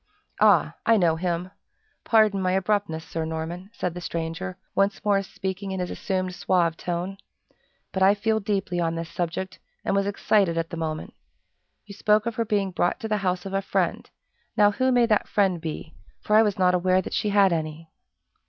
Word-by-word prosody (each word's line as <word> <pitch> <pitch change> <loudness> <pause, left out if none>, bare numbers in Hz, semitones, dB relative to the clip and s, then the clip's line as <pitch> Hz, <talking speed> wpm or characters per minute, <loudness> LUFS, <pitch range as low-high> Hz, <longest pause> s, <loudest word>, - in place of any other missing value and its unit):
"Ah! - - +5
I 225 0 +4
know 170 -5 +3
him! 175 +1 -2 0.5
Pardon 215 -3 +4
my 185 0 +1
abruptness, 190 -4 0
Sir 165 0 -4
Norman," 160 +4 -5
said 180 -6 -3
the 180 - -7
stranger, 170 +3 -4 0.2
once 195 +1 0
more 200 -1 +3
speaking 195 0 -5
in 190 0 -3
his 180 - -3
assumed 185 -1 -2
suave 175 -3 +1
tone, 180 +3 -4 0.7
"but 190 - -3
I 195 +2 +6
feel 220 +1 0
deeply 195 -4 -1
on 165 -1 0
this 165 0 -5
subject, 175 +2 -4 0.3
and - - +1
was 200 0 +1
excited 200 -3 +2
at 165 0 -2
the - - -4
moment. 155 -1 -4 0.7
You 205 - -10
spoke 210 +2 +2
of 235 - -1
her 230 - +1
being 205 -3 0
brought 175 +4 0
to 220 - -3
the 215 -1 0
house 180 -2 -1
of 195 - -6
a 195 - +1
friend 195 - -1 0.5
now, 205 -1 +6
who 260 +5 +1
may 245 -1 +4
that 215 -2 +1
friend 190 -5 +1
be, 160 0 -6 0.3
for 210 - 0
I 220 - +8
was 210 -3 +1
not 180 -1 +3
aware 185 +1 +2
that - - -7
she 210 - 0
had 200 -3 +4
any?" 160 0 -4
190 Hz, 195 wpm, -25 LUFS, 170-205 Hz, 0.7 s, I